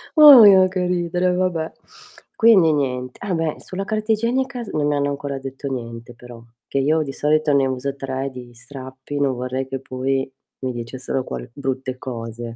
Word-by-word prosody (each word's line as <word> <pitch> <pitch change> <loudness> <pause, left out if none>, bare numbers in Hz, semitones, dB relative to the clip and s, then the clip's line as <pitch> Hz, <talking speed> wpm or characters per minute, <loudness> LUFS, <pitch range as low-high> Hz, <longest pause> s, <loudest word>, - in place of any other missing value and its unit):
Òhi, 275 -10 +10
ah, 185 0 +5
che 185 -1 -2
ridere, 180 0 0
vabbè. 180 -3 -1 0.6
Quindi 195 -9 +5
nient 125 -3 -2
Ah, 200 -2 -3
beh 165 -2 -1
sulla 190 +1 -5
carta 215 +1 -2
igienica 245 +4 0
non 150 -1 +1
hanno 145 -1 0
ancora 140 -1 -4
detto 135 +1 -7
niente 120 -2 -6
però, 120 -1 -13 0.2
che 140 - -1
io 155 +4 +2
di 135 -2 -6
solito 150 +1 +1
ne 135 -1 +3
uso 130 +1 -3
3 135 0 -4
di 125 -2 -11
strappi, 130 +2 -8
non 140 -2 +1
vorrei 130 +2 -3
che 135 0 -4
poi 135 +1 -2 0.3
mi 130 -1 -2
dicessero 125 +2 -4
qual - - -7
brutte 130 -1 -4
cose. 115 -2 -7
140 Hz, 170 wpm, -21 LUFS, 130-175 Hz, 0.6 s, Òhi